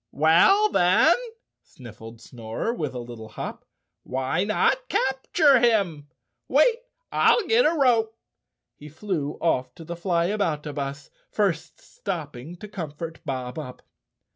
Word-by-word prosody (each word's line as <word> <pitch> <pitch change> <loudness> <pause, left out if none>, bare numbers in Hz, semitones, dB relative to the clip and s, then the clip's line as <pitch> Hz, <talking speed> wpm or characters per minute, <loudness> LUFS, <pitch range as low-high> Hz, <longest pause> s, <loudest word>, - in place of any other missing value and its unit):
"Well, 175 - +5
then," 185 - +4 0.5
sniffled 115 -2 -13
Snorer 115 - -4
with 150 - -4
a - - -3
little 120 -2 -9
hop, 105 - -7 0.4
"why 130 +7 -1
not 355 - +1
capture 265 +1 +3
him? 200 -11 +1 0.4
Wait, 380 - +4 0.3
I'll 465 - +3
get 470 +2 +4
a 330 - 0
rope." 230 -5 +2 0.6
He 150 - -12
flew 155 -3 -3
off 130 -6 0
to 165 - -11
the 170 +2 -6
Flyaboutabus, 160 -6 -2 0.2
first 195 -6 -1
stopping 155 -4 -6
to 210 - -10
comfort 165 -4 -7
Bob 130 0 -4
Up. 130 -5 -9
165 Hz, 120 wpm, -24 LUFS, 140-220 Hz, 0.6 s, Well